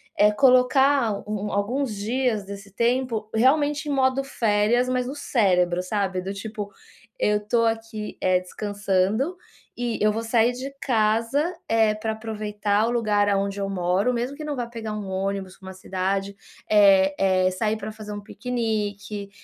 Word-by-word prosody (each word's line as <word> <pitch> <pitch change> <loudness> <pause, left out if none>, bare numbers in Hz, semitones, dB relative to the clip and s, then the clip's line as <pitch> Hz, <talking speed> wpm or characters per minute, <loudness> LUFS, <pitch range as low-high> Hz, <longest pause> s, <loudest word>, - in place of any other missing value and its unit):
eh, 210 0 +5
colocar 255 +1 +4 0.2
um 210 -1 -3
um - - -4
alguns 230 +4 -1
dias 225 +1 -1
desse 200 0 -9
tempo 235 0 0
realmente 290 +5 +2
em - - 0
modo 265 -1 +2
férias, 230 -1 +1
mas 255 -1 0
o 275 - -5
cérebro, 180 -10 +1
sabe. 190 -1 -1
Do 190 +2 -5
tipo, 210 0 -6 0.5
eu 210 0 +2
tô 230 +1 +2
aqui, 225 -1 -3
eh, 185 -1 +3
descansando 205 - -1 0.4
e 240 -1 -2
eu 210 0 +4
vou 225 +2 -3
sair 230 +1 +3
de 260 +3 -6
casa, 230 +1 +1 0.3
eh, 220 -1 +3
pra 220 +1 -3
aproveitar 215 -1 -1
o - - 0
lugar 210 -4 +2
aonde 200 0 0
eu 195 - -2
moro, 190 +5 +1
mesmo 245 +3 -2
que 305 - -8
não 300 -1 -3
vá 240 -1 -2
pegar 230 -2 -6
um 210 -2 -5
ônibus 190 0 -3
pra 190 - -13
uma - - -8
cidade, 190 +1 -2 0.3
eh 195 -2 +5
eh, 185 -1 +3
sair 215 +3 -1
pra 215 +1 -6
fazer 215 -1 -9
um 205 - -6
piquenique, 210 -4 -3
215 Hz, 165 wpm, -24 LUFS, 200-240 Hz, 0.5 s, eh